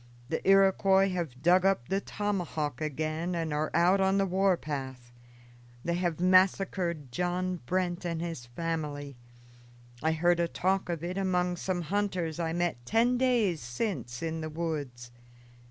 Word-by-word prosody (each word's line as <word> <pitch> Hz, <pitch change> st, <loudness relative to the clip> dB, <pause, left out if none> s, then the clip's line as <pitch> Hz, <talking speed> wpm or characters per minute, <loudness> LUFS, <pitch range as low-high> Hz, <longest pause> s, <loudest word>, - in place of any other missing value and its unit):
"The 160 Hz, -, -1 dB
Iroquois 195 Hz, 0 st, +5 dB
have 165 Hz, -9 st, -4 dB
dug 180 Hz, +2 st, +5 dB
up 195 Hz, -11 st, +2 dB
the 195 Hz, +1 st, 0 dB
tomahawk 175 Hz, -11 st, -3 dB
again 155 Hz, +3 st, -2 dB
and 165 Hz, -2 st, -2 dB
are 150 Hz, +1 st, 0 dB
out 180 Hz, +4 st, +4 dB
on 190 Hz, +1 st, +3 dB
the 195 Hz, -, +3 dB
war 190 Hz, 0 st, +2 dB
path. 130 Hz, -5 st, -6 dB, 0.7 s
They 170 Hz, -, 0 dB
have 175 Hz, -2 st, -1 dB
massacred 185 Hz, -5 st, +2 dB
John 180 Hz, +4 st, -1 dB
Brent 180 Hz, -1 st, -1 dB
and 170 Hz, -2 st, -2 dB
his 165 Hz, -8 st, -5 dB
family. 145 Hz, 0 st, -4 dB, 0.9 s
I 160 Hz, +1 st, +2 dB
heard 175 Hz, +2 st, +2 dB
a 170 Hz, -, +2 dB
talk 190 Hz, +2 st, 0 dB
of 170 Hz, -2 st, -3 dB
it 180 Hz, +3 st, -3 dB
among 180 Hz, -2 st, +1 dB
some 180 Hz, 0 st, -2 dB
hunters 180 Hz, -3 st, -1 dB
I 165 Hz, -1 st, -1 dB
met 170 Hz, -7 st, -1 dB
ten 235 Hz, -, +2 dB
days 230 Hz, -, +2 dB
since 120 Hz, -, -4 dB
in 160 Hz, 0 st, -3 dB
the 155 Hz, -, -4 dB
woods. 145 Hz, -7 st, -4 dB
175 Hz, 155 wpm, -29 LUFS, 155-185 Hz, 0.9 s, Iroquois